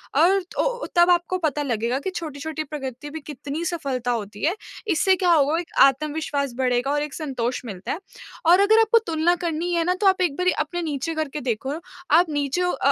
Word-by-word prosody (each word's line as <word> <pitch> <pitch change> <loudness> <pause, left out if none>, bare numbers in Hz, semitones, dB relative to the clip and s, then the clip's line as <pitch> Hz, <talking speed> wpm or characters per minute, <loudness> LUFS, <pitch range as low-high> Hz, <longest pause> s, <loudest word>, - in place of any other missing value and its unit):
और 360 +7 +4
तो - - -1
तब 345 +1 +6
आपको 350 +1 +1
पता 300 -4 -1
लगेगा 240 -1 -1
कि 380 - -3
छोटी-छोटी 310 0 -4
प्रगति 280 -1 -6
भी 320 +2 -6
कितनी 290 +2 -6
सफलता 275 -9 -2
होती 210 -3 -4
है। 350 - +2 0.4
इससे 380 +3 +3
क्या 360 -1 +2
होगा 310 0 +3
एक 350 - -7
आत्मविश्वास 285 -1 0
बढेगा 250 +1 +1
और 290 0 +1
एक 300 -2 -6
संतोष 255 -6 -3
मिलता 195 -5 -6
है। 335 - -3 0.5
और 350 +3 +6
अगर 435 +2 +5
आपको 450 +1 +4
तुलना 330 +2 +2
करनी 340 +1 -1
है 335 -1 +2
ना 360 - +2
तो 400 - +4
आप 375 -1 +4
एक 320 -6 +1
बारी 360 0 +2
अपने 350 0 -4
नीचे 310 0 -3
करके 305 -1 -3
देखो 265 +5 -2 0.4
आप 340 +2 +5
नीचों 295 +5 0
अ - - +1
310 Hz, 200 wpm, -23 LUFS, 275-350 Hz, 0.5 s, तब